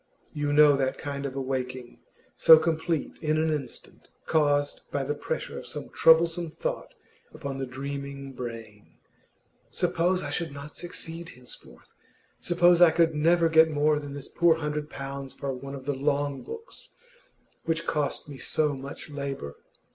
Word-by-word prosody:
You 145 -1 -1
know 145 0 +7
that 130 -1 0
kind 140 -1 -4
of 135 - -8
awaking, 130 -2 -4 0.4
so 160 - +9
complete 160 0 -1
in 155 0 +1
an 160 0 +1
instant, 140 -5 -6 0.2
caused 145 -2 +1
by 140 - -1
the 145 +2 -1
pressure 145 - -4
of - - -10
some - - -6
troublesome 165 +1 +4
thought - - -5 0.4
upon 140 -3 -5
the 135 - -3
dreaming 140 +1 -6
brain. 115 -4 -8 0.7
'Suppose 180 +2 0
I 145 - -4
should 165 0 -2
not 140 +1 -9
succeed 170 -1 -7
henceforth? 120 - -13 0.5
Suppose 175 0 +4
I 175 - +9
could 165 0 +3
never 165 +3 +3
get 160 0 +6
more 150 0 +2
than 145 -1 -7
this 140 -1 -7
poor 170 -1 +3
hundred 150 -1 -3
pounds 135 0 -7
for 140 -1 -3
one 135 +2 -7
of 135 -1 -9
the 145 - 0
long 140 0 -1
books 455 0 -10 0.8
which 165 0 -1
cost 150 -1 -1
me 140 -2 -9
so 150 +3 +1
much 135 +1 -8
labour? 140 - -5
145 Hz, 155 wpm, -27 LUFS, 135-160 Hz, 0.8 s, so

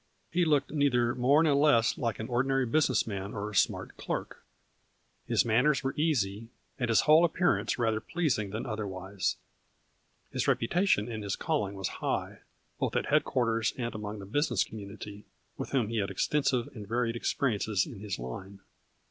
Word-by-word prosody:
He 175 +1 +2
looked 150 -3 +2
neither 125 -5 +2
more 140 +5 +4
nor 155 -3 +3
less 140 -6 +4
than 115 -2 -2
an 110 - -5
ordinary 135 +2 +1
business 130 -1 +2
man 100 -1 -5
or 105 +1 -4
smart 95 - +1
clerk. - - -5 0.8
His - - +2
manners 125 +6 +3
were 135 - -1
easy, 115 -9 0 0.3
and 120 -2 -1
his 115 - +5
whole 155 +2 +6
appear 175 +2 +3
ance - - -2
rather 110 -3 +1
pleasing 140 - -1
than 110 +5 -4
otherwise. 100 -4 -3 0.9
His - - -1
rep - - +3
utation 145 - +2
in 110 -3 -5
his 100 -2 -2
calling 125 -12 -1
was 95 -1 -2
high, - - -2 0.4
both - - -1
at - - +1
head - - +5
quarters 115 -3 0
and 120 -2 -3
among 105 -1 -5
the 100 - -8
business 120 - +1
community, 105 0 -9 0.3
with - - -5
whom 125 -6 +1
he 115 - -2
had 100 -2 0
extensive 125 +4 +1
and 105 -3 -8
varied 115 +1 0
expe 120 - -2
riences 105 -7 +1
in 110 - -9
his 100 -3 -4
line. 95 +11 -8
115 Hz, 175 wpm, -30 LUFS, 105-135 Hz, 0.9 s, whole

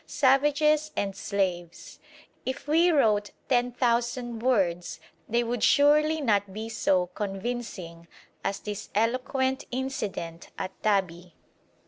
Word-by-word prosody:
Savages 295 +2 +3
and 195 -1 -2
slaves! 180 -4 -3 0.4
If 260 +2 -5
we 330 +4 +4
wrote 215 -10 +3 0.2
ten 245 -1 +2
thousand 240 -1 0
words 190 -9 0 0.3
they 235 +2 +2
would 235 -1 -2
surely 300 +2 +4
not 205 -6 +1
be 220 +3 -6
so 190 -5 +2
convincing 195 -5 -5 0.4
as 195 0 -2
this 210 -1 -6
eloquent 260 +4 0
incident 210 -10 -4
at 185 - -4
Tabi. 180 -5 0
230 Hz, 110 wpm, -27 LUFS, 195-265 Hz, 0.4 s, we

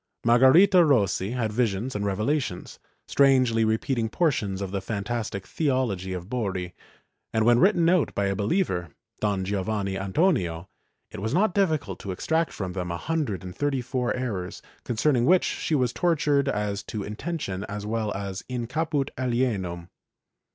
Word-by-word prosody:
Margarita 150 +11 +6
Rossi 105 - +2
had 115 -4 -1
visions 115 +1 -1
and 105 - -2
revelations, 105 +1 -2 0.3
strangely 130 -5 +4
repeating 110 +1 0
portions 110 - 0
of 100 -2 -4
the 100 -1 -2
fantastic 105 -1 -3
theology 125 - -1
of 90 -1 -5
Borri, 95 -7 -3 0.6
and 110 -1 +1
when 120 0 +5
written 175 -2 +4
out 180 -2 +2
by 100 - +1
a 100 0 0
believer, 100 - 0 0.3
Don 100 -3 0
Giovanni 100 0 -2
Antonio, 95 - 0 0.4
it - - -7
was 110 +7 -2
not 195 0 +3
difficult 155 - 0
to 100 - -8
extract 160 - 0
from 95 -3 -5
them 90 -1 -3
a 85 - -2
hundred 140 - -2
and 90 -1 -8
thirty 145 0 0
four 125 0 -1
errors, 105 -8 -4 0.2
concerning 120 +1 +1
which 180 +4 +5
she 160 - -1
was 125 -4 +1
tor 175 -2 +2
tured 145 -2 +1
as 105 -4 -1
to 105 -2 -5
intention 105 - -4
as 105 0 -6
well 110 -1 -1
as 100 -1 -5
in 125 -2 -3
caput 145 +2 -1
alienum. 105 -9 -1
115 Hz, 160 wpm, -26 LUFS, 100-140 Hz, 0.6 s, Margarita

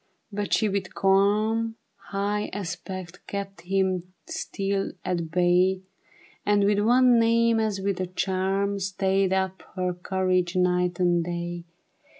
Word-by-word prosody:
But 205 0 -3
she 220 - +3
with 195 -2 -3
cahii, 210 +4 +2 0.3
High 205 +1 -1
aspect 180 -1 -6
kept 195 -2 -5
him 185 0 -1
still 195 0 -2
at 170 -3 -1
bay, 180 +2 +2 0.6
And 205 -1 +3
with 205 0 +3
one 245 +2 +5
name 230 0 +3
as 215 -3 0
with 195 -1 -1
a 185 - -1
charm, 195 +2 -1
Stayed 190 0 +1
up 190 0 0
her 180 -1 -1
courage 185 0 0
night 180 0 +1
and 175 -1 +3
day. 175 0 -4
190 Hz, 130 wpm, -26 LUFS, 180-200 Hz, 0.6 s, one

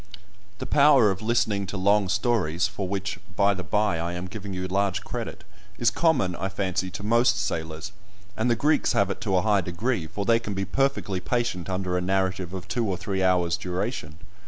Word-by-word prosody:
The - - -5
power 140 -7 +5
of 95 - -4
listening 110 -3 +1
to 100 - -4
long 100 +1 +3
stories 100 -5 +1
(for 95 - -4
which, 100 +1 -3 0.2
by 100 +1 +4
the 95 - -5
bye, 100 +1 +1
I 85 +1 -2
am 90 +1 -4
giving 100 +1 -7
you 90 0 -3
large 95 0 0
credit) - - -6 0.3
is 120 0 +3
common, 130 - +2
I 95 - -2
fancy, 95 -1 -2
to 100 +2 -7
most 120 +3 +3
sailors, 80 +4 -3 0.4
and 115 +3 0
the 120 - +3
Greeks 150 +6 +2
have 100 -1 +2
it - - -6
to 95 -3 +1
a 90 - +2
high 105 -2 +3
degree, 90 +1 -2
for 100 +5 -4
they 115 +2 +4
can 105 -4 -5
be 95 0 -1
perfectly 135 -4 0
patient 115 -4 -2
under 90 -1 -1
a - - -3
narrative 95 -1 -1
of 95 -1 -7
two 120 0 -1
or 95 - -1
three 95 0 -2
hours' 90 -2 +2
duration. 90 - -4
95 Hz, 205 wpm, -26 LUFS, 90-110 Hz, 0.4 s, power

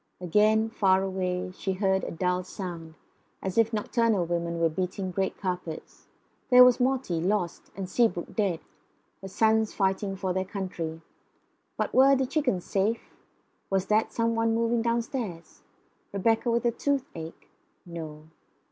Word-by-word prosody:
Again, 215 +5 +3
far 190 -3 +3
away, 185 -1 -2
she 190 +1 -3
heard 190 0 +1
the - - -4
dull 180 +2 -1
sound, 175 -4 -7 0.4
as 190 -1 -4
if 230 0 +3
nocturnal 220 -3 +1
women 170 0 -2
were 165 - +4
beating 185 +3 -3
great 190 +1 -1
carpets. 180 -4 -5 0.4
There 250 0 +9
was 250 0 +5
Morty 250 -10 0
lost, 185 -1 -1
and 195 -1 -4
Seabrook 185 -4 0
dead; 195 -7 0 0.6
her 195 - -7
sons 220 +2 +2
fighting 195 0 0
for 190 -1 -2
their 190 +1 0
country. 180 -5 -5 0.8
But - - -2
were 270 +1 +6
the 265 0 +1
chickens 250 - 0
safe? 210 +4 -1 0.6
Was 195 -1 +1
that 215 +1 +2
some 230 0 0
one 225 0 +1
moving 230 0 +1
downstairs? 230 -6 -3 0.5
Rebecca 225 +4 +1
with 235 0 +1
the 240 - +3
toothache? 240 - -3 0.4
No. 160 -3 -8
195 Hz, 145 wpm, -27 LUFS, 180-230 Hz, 0.8 s, There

